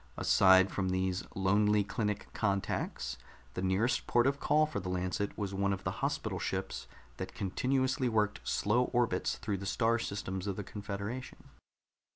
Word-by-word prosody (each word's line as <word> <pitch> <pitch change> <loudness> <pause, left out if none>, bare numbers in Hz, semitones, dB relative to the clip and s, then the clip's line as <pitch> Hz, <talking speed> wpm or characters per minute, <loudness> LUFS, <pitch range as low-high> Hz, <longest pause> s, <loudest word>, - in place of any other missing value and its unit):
Aside 95 0 +5
from 95 -2 -1
these 95 0 0
lonely 105 +2 +3
clinic 105 +1 -2
contacts, 100 -3 -1 0.3
the 90 - -3
nearest 95 +6 +1
port 120 0 +3
of 140 +1 +1
call 155 +1 +3
for 150 -9 -4
the 90 -1 -5
Lancet 90 +2 -2
was 100 -2 -3
one 100 +1 +1
of 95 -1 -3
the - - -1
hospital - - -1
ships - - -3 0.3
that - - -6
continuously 130 +6 0
worked 105 -3 +1
slow 120 +5 +2
orbits 120 -8 +1
through 105 -3 -3
the 100 +1 -6
star 115 +2 +2
systems 95 -3 -4
of 100 - -1
the 105 - -4
confederation. 105 +5 -6
100 Hz, 160 wpm, -32 LUFS, 95-115 Hz, 0.3 s, Aside